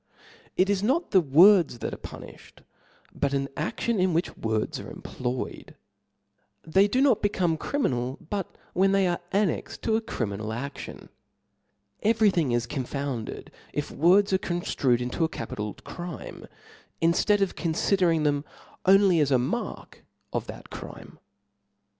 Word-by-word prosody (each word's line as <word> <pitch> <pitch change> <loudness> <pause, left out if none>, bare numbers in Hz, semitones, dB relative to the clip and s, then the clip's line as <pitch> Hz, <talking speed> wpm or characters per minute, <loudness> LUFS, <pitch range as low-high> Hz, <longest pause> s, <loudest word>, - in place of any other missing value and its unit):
It 185 - +4
is 200 -1 +1
not 275 - +1
the 190 - +6
words 170 0 +6
that - - -4
are - - -5
pu - - -9
nilbed, - - -14 0.5
but 140 -1 0
an 135 0 0
adlion 210 +7 -1
in 185 -2 +2
which 170 - -1
words 110 -1 -2
are - - -8
employ 125 0 -4
* - - -12
ed, - - -16 0.9
They 190 +5 +4
do 255 +6 +1
not 260 -6 +4
become 185 -5 +1
criminal, 130 - -1
but 200 -3 -3 0.2
when 195 +1 +3
they 195 -1 +3
are 175 -1 0
annexed 200 -3 -1
to 220 - +2
a 225 - +1
criminal 110 - -4
aftion: 140 +5 -7 0.9
every 220 -1 +4
thing 160 -8 +1
is 120 0 +1
confounded, 130 -2 -4 0.2
if 145 - -3
words 190 +5 +4
are 190 - +3
conftrued 140 -9 0
into 125 +7 -1
a 160 - +2
capi 115 - -6
tal 105 0 -4
crime, 175 -1 -8 0.5
inftead 180 +5 +3
of 195 - +1
confidering 170 -1 +1
them 145 -1 +1 0.4
only 195 -3 +6
as 145 -2 +3
s^ 130 -2 +4
mark 145 - -4 0.3
of - - -2
that - - -10
crime. - - -10
170 Hz, 155 wpm, -26 LUFS, 135-195 Hz, 0.9 s, the